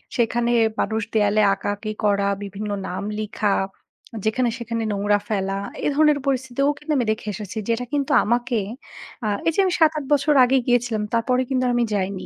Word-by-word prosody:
সেখানে 235 0 +1 0.3
মানুষ 220 0 0
দেয়ালে 210 0 +3
আঁকাআঁকি 205 +2 -3
করা, 200 -1 +2 0.2
বিভিন্ন 205 +1 -6 0.2
নাম 185 +2 -4 0.2
লিখা, 210 -1 0 0.7
যেখানে 235 +3 +1
সেখানে 230 -1 -3
নোংরা 205 0 +1
ফেলা, 195 -3 -1 0.3
এ - - +3
ধরনের 300 -1 +4
পরিস্থিতিতেও 265 0 0
কিন্তু 300 +2 -6
আমি 245 - +1
দেখে 215 0 -5
এসেছি 210 0 -7
যেটা 230 +2 0
কিন্তু 285 0 0
আমাকে, 240 +1 0 0.7
আ - - +1 0.2
এই - - +5
যে - - -1
আমি 370 - +1
৭ 320 -2 +6
৮ 300 - -3
বছর 290 +1 +3
আগে 250 +2 +3
গিয়েছিলাম, 245 -3 +1
তারপরে 250 +2 +2
কিন্তু 255 -1 +1
আমি 240 0 +2
যাইনি। 195 -1 -2
230 Hz, 170 wpm, -22 LUFS, 205-255 Hz, 0.7 s, ৭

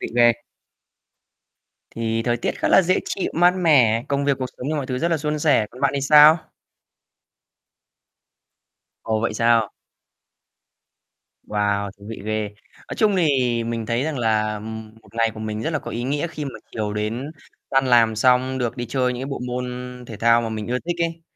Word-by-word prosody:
vị - - -4
ghê. 120 -1 +6 1.6
Thì 115 0 -2
thời 120 0 0
tiết - - -3
khá - - 0
là - - +6
dễ 185 +1 +1
chịu, 195 - -3
mát 175 +1 +5
mẻ, 130 -10 +3
công 140 0 0
việc, 140 -2 +1
cuộc 130 - -2
sống 125 - -18
cũng 130 - -4
như 155 - -1
mọi 140 -3 -2
thứ 125 -1 -3
rất 170 - 0
là 165 - +2
suôn 150 0 -2
sẻ, 145 -8 +3
còn 125 +2 -13
bạn - - +3
thì 140 - -1
sao? 150 +3 +7 2.6
Ồ, 110 -1 -1
vậy 115 - -1
sao? 115 -2 +3 1.7
Wow, 100 -1 -1
thú 100 - -15
vị 115 - -7
ghê. 110 -1 -2 0.4
Nói - - -5
chung 210 -3 +2
thì 130 -8 +1
mình 115 -1 -3
thấy 115 +3 0
rằng 155 -4 -3
là, 110 -2 +1
ừm, 110 +1 -8
1 - - -20
ngày 115 0 +2
của 110 - -8
mình 110 0 -4
rất 160 - -1
là 155 - -1
có - - -8
ý 120 - -4
nghĩa 145 +5 -1
khi 155 -3 -6
mà 140 - -4 0.2
chiều 105 -2 -3
đến 115 +7 -3 0.4
tan 135 0 +2
làm 115 -3 +4
xong 130 +3 +2
được 125 -1 -2
đi 120 -1 -4
chơi 125 0 0
những 125 - -6
cái - - -4
bộ 135 - -4
môn 125 0 -3 0.4
thể 110 - -8
thao 115 +2 +4
mà 115 - -3
mình 110 -1 -5
ưa 125 +1 0
thích 175 +5 -4
ấy. 165 0 -3
120 Hz, 200 wpm, -22 LUFS, 110-145 Hz, 2.6 s, sao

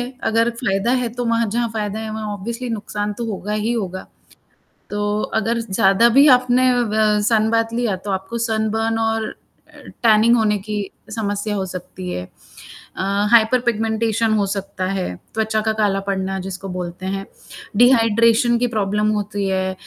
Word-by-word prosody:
है, 245 +2 -4
अगर 230 +1 +2
फ़ायदा 195 -1 0
है 240 - -1
तो 245 - -3
वहाँ 230 0 +1
जहाँ, 235 0 0
फ़ायदा 210 -1 -2
है 220 0 -5
वहाँ 220 0 -4
ऑब्वियसली 235 +5 -5
नुकसान 210 -1 -3
तो 235 - -2
होगा 205 +1 -4
ही 215 +2 0
होगा। 190 -5 -4 0.8
तो 205 0 -1 0.2
अगर 230 +2 -1
ज़ 230 -3 -7
ज़्यादा 195 +5 +4
भी 285 - +8
आपने 255 +1 +2
अ, 245 -1 +2
ब 215 -1 +2
सनबाथ 225 +1 +2
लिया 235 -5 0
तो 205 - -2
आपको 190 +4 -3
सनबर्न 225 0 0
और 225 -1 -1 0.7
टैनिंग 225 +1 +5
होने 210 -2 +2
की 210 +1 -3 0.3
समस्या 205 -1 -2
हो 195 -1 -2
सकती 180 0 -7
है। 90 - -4 0.5
अ, - - -8 0.3
हाइपर 235 +2 +5
पिगमेंटेशन 225 0 +1
हो 205 -2 +2
सकता 195 -1 -4
है, 185 - -2 0.2
त्वचा 220 0 0
का 220 0 0
काला 205 -2 +1
पड़ना 195 -1 -2
जिसको 190 +1 -6
बोलते 180 0 -6
हैं। 195 - -5 0.6
डिहाइड्रेशन 230 -1 +4
की 245 - +1
प्रॉब्लम 210 +1 +1
होती 205 -1 -3
है, 190 0 -1
215 Hz, 165 wpm, -20 LUFS, 195-230 Hz, 0.8 s, भी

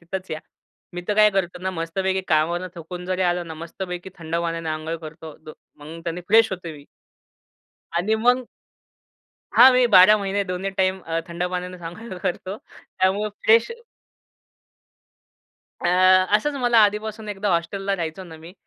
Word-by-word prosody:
तिथंच 185 +2 -7
या. 155 0 -4 0.5
मी 175 - -5
तर 210 - +1
काय 210 0 +6
करतो 185 -2 -2
ना 190 - -1
मस्तपैकी 190 +3 -2
कामावरून 170 +3 +1
थकून 175 +1 -8
जरी 185 0 -1
आलं 175 -1 0
ना 160 - -7
मस्तपैकी 180 +3 -7
थंड 165 0 -3
पाण्याने 165 -1 -3
अंघोळ 155 +1 -3
करतो. 160 -1 -10 0.4
मग 155 +3 -10
त्यानी 170 +1 -3
फ्रेश 225 0 +5
होतो 180 -2 -6
मी. 145 - -15 1.1
आणि 180 +6 +1
मग 245 +3 +2 1.1
हां 260 - +9
मी 250 0 +4
12 210 -1 +7
महिने 200 0 -1
दोन्ही 185 +1 -3
टाईम 190 0 0
अ, 165 0 -2
थंड 170 +1 -3
पाण्यानेच 180 0 -5
आंघोळ 180 +4 -8
करतो. 185 +3 -3 0.4
त्यामुळे 195 +3 +1 0.2
फ्रेश 225 - +5 2.1
अ, - - +3 0.5
असंच 295 +7 -2
मला 240 -2 +3
आधीपासून 210 +1 -1
एकदा 205 0 -3
हॉस्टेलला 195 +4 -1
राहायचो 165 +1 -5
ना 165 -3 -11
मी. 165 +2 -13
180 Hz, 150 wpm, -23 LUFS, 170-200 Hz, 2.1 s, हां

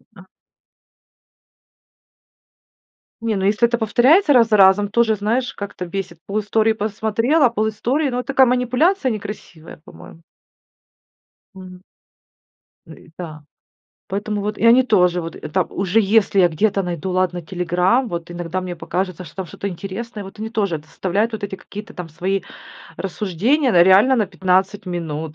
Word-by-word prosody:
А. 185 -1 -15 2.9
Не, 225 -1 -1
ну, 190 -1 -1
если 210 +3 +3
это 235 0 -2
повторяется 260 - +4
раз 240 -4 +5
за 215 - +4
разом, 195 +1 +5
тоже, 220 0 +2
знаешь, 230 +5 -1
как-то 200 -3 -6
бесит. 175 -2 -6
Пол 205 +2 -1
истории 220 +1 +1
посмотрела, 220 +7 +1
пол 220 -1 -1
истории, 270 +7 -1
но 250 -1 -2
такая 265 0 +3
манипуляция 255 +7 +1
некрасивая, 205 -6 -8
по-моему. 165 - -14 1.3
Мгм. 185 -1 -12 1.1
Ну - - -11
и - - -18
да. 155 -4 -8 0.6
Поэтому 205 +1 -3
вот 210 +1 -3
и - - 0
они 240 +3 +6
тоже 180 -7 +2
вот, 165 0 -7
это 185 +4 -1
уже, 195 +5 0
если 200 -1 +2
я 180 - +6
где-то 195 +4 0
найду, 180 +1 -4
ладно, 180 -1 0
"Телеграм", 180 +8 0
вот 170 -2 -5
иногда 175 +1 -4
мне 180 -1 -5
покажется, 185 +1 -4
что 160 - -14
там 190 - -4
что-то 200 +4 -6
интересное, 200 +4 -7
вот 195 +2 -12
они 220 +1 -4
тоже 200 -9 -1
составляют 195 +7 -1
вот 220 -2 -6
эти 195 - -7
какие-то 205 +2 -10
там 175 -2 -7
свои 190 +5 -2 0.6
рассуждения, 210 - 0
да, 175 -2 +6
реально 195 +9 +5
на 215 -4 +1
15 190 +2 0
минут, 160 -3 -4
200 Hz, 150 wpm, -20 LUFS, 180-225 Hz, 2.9 s, они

